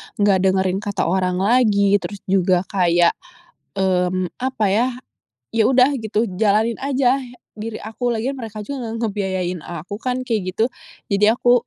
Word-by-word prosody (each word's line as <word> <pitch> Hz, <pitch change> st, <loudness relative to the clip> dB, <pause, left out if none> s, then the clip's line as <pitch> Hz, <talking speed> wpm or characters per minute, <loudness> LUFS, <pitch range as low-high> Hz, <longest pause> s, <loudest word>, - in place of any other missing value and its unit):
nggak 205 Hz, -2 st, +3 dB
dengerin 190 Hz, 0 st, +1 dB
kata 205 Hz, -1 st, -2 dB
orang 180 Hz, +1 st, 0 dB
lagi 205 Hz, -3 st, +3 dB
terus 200 Hz, +1 st, -7 dB
juga 185 Hz, -1 st, +2 dB
kayak, 175 Hz, -3 st, +3 dB, 0.6 s
mmm, 185 Hz, -1 st, 0 dB
apa 255 Hz, -4 st, -1 dB
ya, 225 Hz, +5 st, +3 dB, 0.6 s
ya 225 Hz, -1 st, +2 dB
udah 260 Hz, +1 st, +5 dB
gitu 220 Hz, -1 st, -1 dB, 0.2 s
jalanin 220 Hz, +2 st, +2 dB
ajah 270 Hz, -1 st, +2 dB, 0.4 s
diri 215 Hz, +1 st, -6 dB
aku, 235 Hz, +3 st, -2 dB
lagian 260 Hz, +5 st, -2 dB
mereka 220 Hz, -3 st, -6 dB
juga 255 Hz, +2 st, -5 dB
nggak 225 Hz, 0 st, -2 dB
ngebiayain 190 Hz, -3 st, -2 dB
aku 175 Hz, +5 st, -7 dB
kan 255 Hz, +2 st, -2 dB
kayak 210 Hz, -7 st, -2 dB
gitu. 225 Hz, +5 st, +1 dB, 0.4 s
Jadi 200 Hz, +1 st, +3 dB
aku 245 Hz, -1 st, +3 dB
210 Hz, 150 wpm, -20 LUFS, 190-235 Hz, 0.6 s, udah